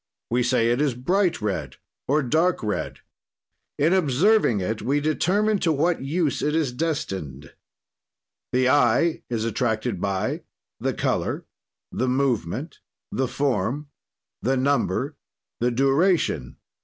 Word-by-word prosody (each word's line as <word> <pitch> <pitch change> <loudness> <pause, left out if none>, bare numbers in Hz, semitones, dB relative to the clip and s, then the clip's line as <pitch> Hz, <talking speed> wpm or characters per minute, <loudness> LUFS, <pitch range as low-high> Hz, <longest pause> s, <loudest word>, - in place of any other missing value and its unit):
We 125 +1 +2
say: 120 -2 +2
it 120 +4 +1
is 140 -5 +1
bright 175 - +1
red 80 -11 -2 0.3
or 150 +2 +2
dark 160 +6 +1
red. 105 - -3 0.8
"In 155 +5 +3
observing 175 - +3
it 110 +4 -2
we 140 +3 +1
determine 195 +8 +1
to 165 - +2
what 160 +3 +1
use 150 +2 0
it 150 +1 0
is 155 -6 +1
destined. 95 - -4 1.0
"The 125 0 +2
eye 145 +4 +3
is 115 -2 -1
attracted 110 -2 -1
by: 95 -2 -1 0.4
"The - - -1
color. - - -1 0.5
"The 130 - -1
movement. 125 - -1 0.3
"The 130 0 0
form. 140 +2 -1 0.5
"The 130 +3 +1
number. 140 +1 0 0.4
"The 120 - +2
duration. 135 - +1
135 Hz, 125 wpm, -24 LUFS, 115-155 Hz, 1.0 s, In